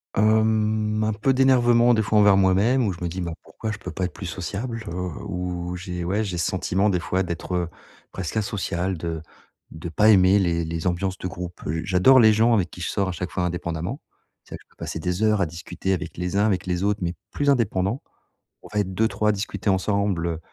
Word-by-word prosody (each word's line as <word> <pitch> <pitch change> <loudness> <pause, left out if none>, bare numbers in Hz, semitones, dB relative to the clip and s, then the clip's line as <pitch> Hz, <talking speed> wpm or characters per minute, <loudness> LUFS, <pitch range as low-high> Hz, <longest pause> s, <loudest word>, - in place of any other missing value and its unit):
Hem, 110 0 +2
un 110 0 +1
peu 130 +5 +1
d'énervement, 120 -2 +4
des 110 - +2
fois, 105 +1 +2
envers 100 -2 +6
moi-même 100 +7 +3
où 95 - 0
je 85 - -13
me - - 0
dis: 90 +3 -5
«Bah 85 -2 -3
pourquoi 110 - -6
je 105 - -6
peux - - -7
pas 95 - -2
être 90 - -5
plus 100 -4 -7
sociable?» 110 +6 -5
heu, 85 - -5
ou, 90 0 -4
j'ai 90 -1 -5
ouais, 100 +5 0
j'ai 90 -4 -3
ce 85 - 0
sentiment, 95 +2 +1
des 90 -3 +1
fois, 95 +2 -1
d'être, 85 +1 -4
heu, 85 -1 -1 0.4
presque 95 +3 -4
asociale, 95 -3 -1
de 80 -1 -4 0.5
de 80 +2 -7
pas 105 +7 +4
aimer 95 0 +6
les 85 -3 +1
les 80 +1 -4
ambiances 95 +2 -1
de 90 - -4
groupe. 90 0 -7
Heu, 80 +2 -2
j'adore 100 +8 +5
les 110 -2 +7
gens 115 +2 +4
avec 95 -6 +2
qui - - -12
je - - -2
sors 100 -2 0
à - - -1
chaque 90 +2 -5
fois 90 - -1
indépendamment. 85 - -3 0.4
C'est - - -13
vrai - - -5
que - - -20
je - - -61
peux - - -29
passer - - -5
des 90 +5 -2
heures 105 -2 +3
à 85 - +2
discuter 85 +4 -4
avec 90 - -4
les 90 +3 -2
uns, 105 - +4
avec 95 -4 0
les 90 +1 -1
autres, 105 +1 +1
mais 85 0 -2 0.2
plus 145 0 0
indépendants. 115 -3 +1 0.6
On - - -11
va 105 - +1
être 95 -2 -2
2-3 110 -1 +1
à - - +6
discuter 100 0 -3
ensemble, 100 -2 +1
heu, 80 -1 -3
95 Hz, 235 wpm, -24 LUFS, 90-110 Hz, 0.6 s, les